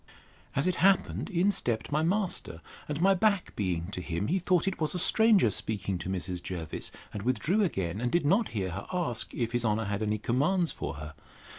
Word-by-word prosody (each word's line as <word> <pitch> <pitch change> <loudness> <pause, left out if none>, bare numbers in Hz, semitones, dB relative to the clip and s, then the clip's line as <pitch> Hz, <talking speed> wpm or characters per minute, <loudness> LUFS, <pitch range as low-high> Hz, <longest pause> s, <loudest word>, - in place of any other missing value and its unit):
As 140 - +1
it 185 -1 +1
happened, 195 +3 +2
in 190 +1 +2
stept 120 - -2
my 150 +2 +2
master; 180 - 0 0.3
and 150 0 -2
my 195 +2 +5
back 200 -1 +1
being 90 -2 -2
to 90 - -4
him, 85 - -3
he 190 +4 +2
thought 180 -1 +1
it 190 -3 -2
was 155 +3 0
a - - 0
stranger 210 - +4
speaking 100 -2 -2
to 90 - -5
Mrs. 90 -1 -3
Jervis, 85 -4 -4 0.2
and 105 - -4
withdrew 130 - +1
again: 95 - -1
and 120 0 -1
did 175 -1 +2
not 200 +9 +3
hear 95 -4 -3
her 100 +4 -6
ask, 170 -11 +1
If 120 -2 -1
his 120 -1 0
honour 110 0 +1
had 100 +1 -2
any 105 0 0
commands 155 - +1
for - - -5
her? 75 +1 -8
120 Hz, 205 wpm, -29 LUFS, -, 0.3 s, my